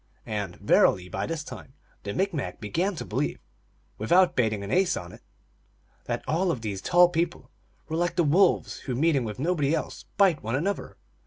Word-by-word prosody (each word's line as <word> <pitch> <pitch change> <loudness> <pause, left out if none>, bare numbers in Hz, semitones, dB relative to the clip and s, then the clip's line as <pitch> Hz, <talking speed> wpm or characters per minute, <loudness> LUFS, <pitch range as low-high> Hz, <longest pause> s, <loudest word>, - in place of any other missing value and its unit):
And, 100 -5 -4
verily, 90 0 +3
by 95 +3 -3
this 165 -2 -3
time 135 -3 -10 0.3
the 100 - -5
Micmac 185 -7 -2
began 175 - -1
to - - -6
believe, - - -2 0.6
without 175 - +4
bating 110 -4 +1
an 100 - -6
ace 185 -1 +2
on 85 0 -7
it, - - -14 0.8
that - - -3
all 175 +4 +1
of 130 -9 -1
these 100 -3 -4
tall 175 0 +5
people 175 0 -2 0.4
were 160 - -3
like 175 0 0
the 175 - +3
wolves, 175 +5 +3
who, 130 - -4
meeting 140 -2 +2
with 105 -1 -5
nobody 150 0 +1
else, 155 - -5
bite 195 -6 +4
one 115 +3 -2
another. 195 +9 -2
155 Hz, 180 wpm, -26 LUFS, 110-175 Hz, 0.8 s, tall